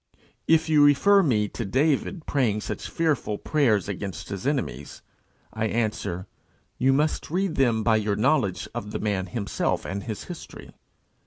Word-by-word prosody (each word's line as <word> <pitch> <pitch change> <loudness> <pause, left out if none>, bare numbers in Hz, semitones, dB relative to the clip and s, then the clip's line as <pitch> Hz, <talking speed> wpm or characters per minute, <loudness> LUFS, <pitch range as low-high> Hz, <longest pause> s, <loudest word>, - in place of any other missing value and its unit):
If 160 0 +4
you 155 -2 +5
refer 195 +8 +5
me 110 - +2
to 115 - -5
David 145 - 0
praying 115 -7 +1
such - - -5
fearful 150 -10 0
prayers 130 -10 +1
against 95 -3 -5
his 100 +4 -4
enemies, 120 - -3 0.5
I 110 0 -1
answer, 110 -5 -2 0.5
you 130 +1 +4
must 150 +3 0
read 185 +2 0
them 120 -6 +2
by 110 0 +4
your 105 -1 0
knowledge 110 -5 +1
of 105 - -5
the - - -2
man 100 -3 -1
himself 105 0 -2
and 100 +1 -4
his 110 -4 -5
history. 175 -2 -10
115 Hz, 155 wpm, -25 LUFS, 105-150 Hz, 0.5 s, you